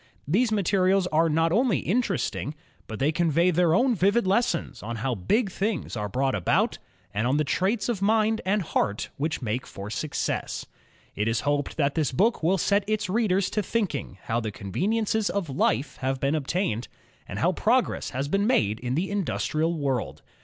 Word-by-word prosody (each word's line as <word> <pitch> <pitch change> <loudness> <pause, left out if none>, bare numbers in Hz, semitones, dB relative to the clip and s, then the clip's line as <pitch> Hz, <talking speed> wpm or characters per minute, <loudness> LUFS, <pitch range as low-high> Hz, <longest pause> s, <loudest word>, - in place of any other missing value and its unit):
These 220 - +2
materials 195 -2 +2
are 165 +1 +3
not 165 +2 +2
only 230 - +3
interesting, 185 - -1 0.3
but 110 - -6
they 140 +6 +2
convey 170 +2 +2
their 170 -1 +3
own 250 +4 +3
vivid 200 +3 +2
lessons 190 -2 0
on 115 +2 -5
how 125 +3 -1
big 190 - 0
things 200 - -2
are 105 -2 -3
brought 135 +5 0
about, 95 - +1 0.3
and 105 +4 0
on 135 +3 +2
the 150 - +2
traits 190 - 0
of 230 -6 -2
mind 220 +1 +2
and 195 +2 +1
heart 105 -9 -1
which 150 -1 -2
make 120 +3 -2
for 100 +2 -8
success. 155 +5 -2 0.5
It 105 +2 -1
is 115 0 +1
hoped 145 0 -1
that 140 -2 +2
this 155 -6 0
book 215 - +2
will 175 +4 +2
set 200 +3 +2
its 215 -2 -1
readers 195 -3 +1
to 210 - 0
think 210 -2 -1
ing 135 -8 -5
how 115 +1 0
the 110 -2 -3
conveniences 210 - -1
of 190 -8 -2
life 130 +1 0
have 135 0 -2
been 140 +2 +1
obtained, 150 - -1 0.4
and - - -6
how - - +2
progress - - +1
has 135 +3 -3
been 200 +7 +1
made 110 - +2
in 125 +1 -2
the 185 +5 -1
industrial 165 -4 -1
world. 135 -5 -2
165 Hz, 185 wpm, -26 LUFS, 130-200 Hz, 0.5 s, are